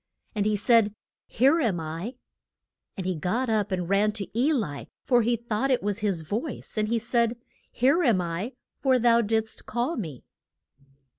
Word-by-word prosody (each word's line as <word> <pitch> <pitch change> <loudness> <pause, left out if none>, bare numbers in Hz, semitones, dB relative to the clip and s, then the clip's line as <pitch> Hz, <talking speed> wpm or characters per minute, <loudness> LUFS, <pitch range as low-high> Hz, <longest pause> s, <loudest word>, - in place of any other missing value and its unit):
And 210 -2 0
he 215 - +2
said, 215 0 +3 0.3
Here 275 +8 +3
am 205 - +1
I. 165 +10 -5 0.8
And 190 - -4
he 185 - 0
got 220 +10 -1
up 210 -2 0
and 180 -2 -1
ran 205 +3 +2
to 210 -3 -4
E 260 +7 +3
li, 205 - -2 0.2
for 245 -2 +4
he 235 +2 +2
thought 235 +3 -2
it 255 -5 +2
was 205 +1 -1
his 195 -6 -1
voice, 230 - -4
and 215 -1 +1
he 230 +2 +1
said, 235 0 +1 0.3
Here 275 +8 +3
am 235 - +3
I, 180 +8 -3 0.3
for 260 -2 +3
thou 235 -1 +4
did'st 220 0 -2
call 245 +8 -1
me. 155 - -6
220 Hz, 175 wpm, -26 LUFS, 200-240 Hz, 0.8 s, for